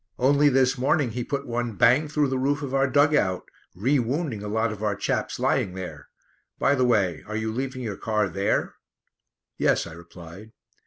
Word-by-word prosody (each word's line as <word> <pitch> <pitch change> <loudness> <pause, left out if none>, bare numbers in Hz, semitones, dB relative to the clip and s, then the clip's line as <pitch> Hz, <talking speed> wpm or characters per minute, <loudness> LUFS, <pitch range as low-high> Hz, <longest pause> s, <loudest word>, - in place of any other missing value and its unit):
Only 140 +3 +4
this 130 -1 +2
morning 135 -1 +1
he 125 +2 -3
put 140 +2 -3
one 120 -1 -3
bang 125 +9 +4
through 150 -2 0
the 130 0 -1
roof 145 +2 0
of 135 -2 -5
our 135 0 +2
dug 145 +2 +4
out, 95 -11 +1 0.3
rewounding 130 - 0
a 105 - -6
lot 110 +2 0
of 105 -1 -8
our 105 -2 0
chaps 100 - -2
lying 90 - 0
there. 80 -7 -8 0.5
By 140 - +2
the 130 -2 +2
way, 105 -8 +1
are 110 - -5
you 110 0 -2
leaving 130 +2 -4
your 105 -4 -4
car 105 -2 0
there?" 100 +1 -1 0.9
"Yes," - - +2
I 85 - -9
replied. 85 +5 -12
120 Hz, 190 wpm, -25 LUFS, 105-135 Hz, 0.9 s, Only